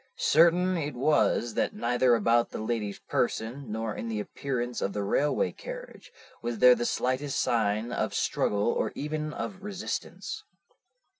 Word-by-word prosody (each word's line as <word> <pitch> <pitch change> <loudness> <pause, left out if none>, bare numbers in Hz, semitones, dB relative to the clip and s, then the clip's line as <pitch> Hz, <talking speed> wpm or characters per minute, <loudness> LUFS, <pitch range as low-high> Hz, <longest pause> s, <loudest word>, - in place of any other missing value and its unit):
Certain 175 +3 +4
it 150 -4 -3
was 125 -3 +2
that - - 0
neither 125 +1 +3
about 115 +2 +3
the - - -6
lady's 110 -2 -2
person, 120 +2 -2
nor 110 0 -2
in 115 - -4
the 110 -2 -2
appearance 125 +1 -3
of 100 - -1
the 105 - -2
railway 145 +9 +1
carriage, - - -9 0.3
was 120 0 -3
there 125 +3 +8
the 120 -1 -1
slightest 130 +2 -1
sign 110 0 +1
of - - -1
struggle 105 +2 +1
or - - -1
even 155 +1 -3
of 190 +5 -5
resistance. 200 0 -5
125 Hz, 150 wpm, -28 LUFS, 115-150 Hz, 0.3 s, there